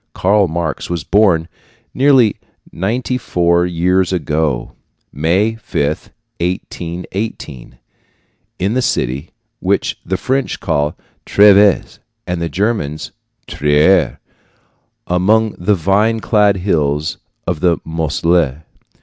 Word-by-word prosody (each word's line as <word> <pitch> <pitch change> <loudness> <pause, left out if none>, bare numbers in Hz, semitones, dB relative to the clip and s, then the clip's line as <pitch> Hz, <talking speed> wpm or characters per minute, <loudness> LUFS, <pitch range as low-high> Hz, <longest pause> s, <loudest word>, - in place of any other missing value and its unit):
Karl 100 +1 +3
Marx 80 0 -3
was 85 -4 -3
born 95 -4 +3 0.5
nearly 130 -5 +4 0.3
ninety 120 +7 -2
four 85 -4 +1
years 90 +2 +1
ago 75 -6 -1 0.4
May 90 +9 +1
5, 70 - -1 0.5
1818 85 - -5 0.8
in 95 +4 -1
the 130 - +1
city 70 - -1 0.3
which - - -1
the 95 +2 -2
French 135 +5 -1
call 75 0 -1 0.3
Treves 100 -1 +4 0.3
and 90 -2 -3
the 85 - -2
Germans 95 -7 -2 0.3
Trier, 75 +6 +2 0.9
among 105 +5 +2
the 100 +4 +2
vine 100 +6 +1
clad 105 -3 +2
hills 75 -5 -1 0.3
of 85 -4 -2
the 85 -1 +2
Moselle. 80 -2 0
90 Hz, 100 wpm, -16 LUFS, 80-105 Hz, 0.9 s, nearly